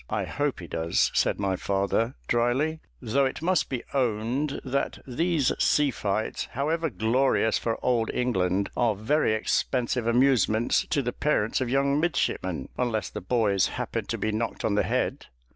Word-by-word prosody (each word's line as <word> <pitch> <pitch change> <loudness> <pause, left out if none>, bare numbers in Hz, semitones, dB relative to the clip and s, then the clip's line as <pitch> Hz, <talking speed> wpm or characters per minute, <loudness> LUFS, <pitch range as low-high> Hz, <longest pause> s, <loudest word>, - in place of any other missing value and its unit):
"I - - -1
hope 145 -7 -2
he - - -7
does," 80 0 0
said - - +1
my 95 -2 0
father, 100 +6 0
drily; 130 +7 +1 0.2
"though 135 +4 +2
it 135 +4 -3
must 180 -2 +1
be 130 -3 -3
owned 125 +3 0
that 135 +1 -1
these 150 +2 +1
sea 150 -2 +3
fights, 105 -1 -2
however 160 +5 0
glorious 115 0 +1
for 115 -1 -1
Old 120 -3 +2
England, 100 -5 0
are 115 -3 +2
very 110 +4 +1
expensive 120 +2 0
amusements 120 -2 +3
to 140 - +1
the 125 - -2
parents 135 -6 0
of 125 - -1
young 140 +2 +2
midshipmen, 95 - -1
unless 115 -4 -1
the - - -6
boys 100 -2 +2
happen - - -3
to - - -2
be 110 - -1
knocked 110 +2 -3
on 105 - +1
the 105 - +3
head." - - -1
120 Hz, 160 wpm, -26 LUFS, 110-140 Hz, 0.2 s, sea